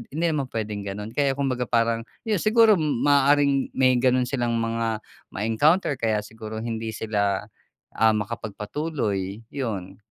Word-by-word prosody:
hindi 170 +2 0
naman 140 -4 -1
pwedeng 105 -2 -3
ganon 105 +3 -5
kaya 140 -1 +1
kumbaga 130 -3 -1
parang 115 -1 +1 0.2
yun 215 -5 0
siguro 215 -2 +5
maaaring 140 -1 +3
may 130 -1 +4
ganon 130 0 +3
silang 120 -3 -1
mga 115 -1 -1 0.3
ma-encounter 135 - +2
kaya 110 -2 0
siguro 110 +1 -7
hindi 115 -1 -4
sila, 100 -3 0 0.6
ah, 110 -1 +5
makapag-patuloy 105 -1 -3
yun. 100 -8 -4
115 Hz, 130 wpm, -24 LUFS, 110-140 Hz, 0.6 s, siguro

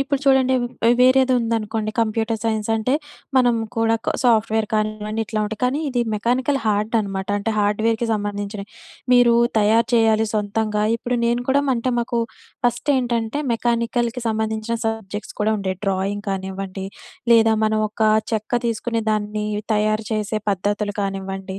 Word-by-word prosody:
ఇప్పుడు 275 0 0
చూడండి 265 -1 +4 0.3
ఆహ్, 240 - +5
వేరేదుందనుకోండి 230 -4 +2
కంప్యూటర్ 225 0 0
సైన్స్ 220 -1 -1
అంటే 250 +5 0 0.4
మనం 245 -2 +4 0.2
కూడా 225 0 +2 0.3
సాఫ్ట్‌వేర్ 220 -2 +3
కానివ్వండి, 215 +1 -1
ఇట్లా 215 -1 -2
ఉంటాయి. 215 +2 -5
కానీ 270 +5 +1
ఇది 250 -2 0
మెకానికల్ 250 +6 +1
హార్డ్ 210 +1 0
అనమాట. 195 -2 -4
అంటే 205 +2 -2
హార్డ్‌వేర్‌కి 220 +3 +1
సంబంధించినయి. 205 -1 -4 0.4
మీరు 245 -1 +6 0.2
తయారు 220 +2 +3
చేయాలి 220 -1 +3
సొంతంగా. 210 0 0
ఇప్పుడు 245 +2 -2
నేను 240 +1 +1
కూడా 280 +2 +4
అంటే 240 +2 -1
మాకు 235 0 -1 0.5
ఫస్ట్ 240 +4 0
ఏంటంటే 235 +1 -1
మెకానికల్‌కి 235 +1 -1
సంబంధించిన 220 +1 -1
సబ్జెక్ట్స్ 220 -2 -4
కూడా 215 - +2
ఉండేయి. 190 -2 -3
డ్రాయింగ్ 195 +2 -1
కానివ్వండి 190 0 -4 0.5
లేదా 225 -1 +5
మనం 215 0 +1
ఒక 220 +1 -4 0.3
చెక్క 220 +2 -2
తీసుకుని 230 0 -1
దాన్ని 210 0 -1 0.3
తయారు 215 +1 +1
చేసే 215 0 -1
పద్ధతులు 205 +2 -1
కానివ్వండి, 195 0 -4
220 Hz, 135 wpm, -21 LUFS, 210-235 Hz, 0.5 s, మీరు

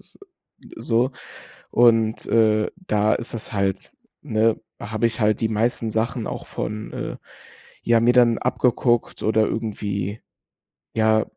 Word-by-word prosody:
s - - -25 0.6
so. 125 - +1 0.6
Und, 115 -2 +3
äh, 110 -2 +3
da 105 - +1
ist 115 - -5
das 115 - -7
halt, 100 -2 -2 0.3
ne, 110 +1 +1 0.2
habe 110 +2 -1
ich 115 +1 -3
halt 105 0 +2
die 110 - +1
meisten 115 +1 0
Sachen 110 +1 -1
auch - - -5
von, 105 0 -5
äh, - - -5 0.7
ja, 115 -1 +3
mir 120 +2 +4
dann 120 -2 +5
abgeguckt 120 -1 0
oder 110 0 +2
irgendwie 105 -2 -3 0.7
ja, 110 -1 +3
110 Hz, 130 wpm, -22 LUFS, 110-115 Hz, 0.7 s, dann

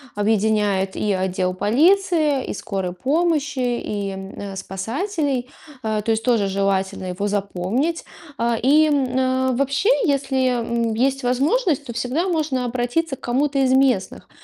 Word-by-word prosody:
объединяет 205 -2 +1
и 210 - -1
отдел 185 -1 -1
полиции, 305 - +2
и - - -3
скорой 190 -3 -4
помощи, 295 - 0
и, 210 -5 -2
м, 195 +1 -7
спасателей, 255 - -3 0.3
а, 215 -1 -1
то 225 - -1
есть 220 0 0
тоже 225 -4 +2
желательно 195 -1 -1
его 185 +3 -2
запомнить. 205 - -1 0.3
А, 235 -1 +1
и, 295 +5 +5
м, 260 -2 +1
вообще, 275 - +1 0.2
если, 270 -3 +1
м, 235 -1 -1
есть 265 +4 0
возможность, 285 - +1
то 245 - -6
всегда 250 +10 -1
можно 300 -6 0
обратиться 255 +5 -1
к - - -29
кому-то 275 +3 0
из 260 -1 +3
местных. 260 -7 +1
245 Hz, 135 wpm, -21 LUFS, 205-280 Hz, 0.3 s, и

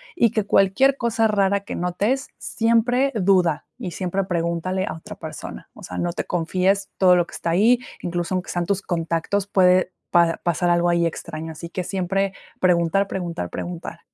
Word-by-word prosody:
y 235 - +3
que 215 -3 0
cualquier 205 +9 +3
cosa 225 -2 +1
rara 200 -1 +2
que 200 - -6
notes, 205 +10 -1
siempre 245 +4 +1
duda 180 -6 +2
y 205 -8 -5
siempre 190 +2 -2
pregúntale 180 +1 -1
a - - -4
otra 160 - -10
persona, - - -8
o - - -14
sea, 90 - -7
no 175 - -1
te - - -3
confíes 185 +3 0
todo 185 -2 +6
lo 175 -1 +2
que - - -15
está 165 - -2
ahí, 225 +8 +4 0.2
incluso 175 +1 -2
aunque 185 - -3
sean 175 -1 -1
tus 195 +2 0
contactos, 170 +3 -1
puede 185 -1 +4 0.2
pa 170 -1 +4
pasar 175 +1 +1
algo 175 0 +3
ahí 170 0 +2
extraño. 160 -1 -5
Así 170 +2 -8
que 180 +1 -3
siempre 195 +1 -1 0.3
preguntar, 180 +2 +2
preguntar, 170 - -4
preguntar. 170 -1 -6
185 Hz, 180 wpm, -22 LUFS, 170-200 Hz, 0.3 s, todo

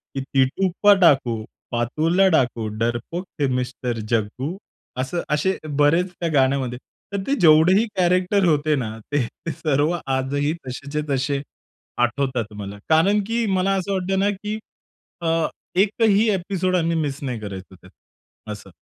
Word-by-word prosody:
की 135 - -1
टीटू 135 +8 +1
पढ़ाकू, 145 - +5 0.3
पार्थो 120 +7 0
पढ़ाकू, 135 - +3
डरपोक 120 - -2
थे 140 - +2
मिस्टर 125 -2 -3
जग्गू. 120 - -1 0.4
असं 130 +7 -2
असे 170 +6 +1 0.2
बरेच 165 +5 +3
त्या 170 - -1
गाण्यामध्ये. 130 -3 +1 0.4
तर 200 - -1
ते 275 - +1
जेवढेही 175 +7 +6
कॅरेक्टर 185 +2 +2
होते 155 -2 +2
ना, 125 -6 -2 0.2
ते 145 -1 +2 0.3
सर्व 150 +2 0
आजही 135 +3 0
तसेच्या 140 +4 -4
तसे 140 +1 0 0.6
आठवतात 120 -3 0
मला 100 0 -7
कारण 175 +7 +4
की 230 0 0
मला 190 +1 +1
असं 195 +1 -2
वाटतं 190 0 0
ना, 200 +1 +2
की 210 +2 -4 0.6
अ, 165 -1 +1 0.3
एकही 210 +2 +3
ॲपिसोड 185 -1 -1
आम्ही 170 -1 +1
मिस 145 -3 -2
नाही 125 -4 -3
करायचो 95 -3 -8
त्यात 95 0 -18 0.6
असं. 105 -2 -9
150 Hz, 135 wpm, -22 LUFS, 130-185 Hz, 0.6 s, जेवढेही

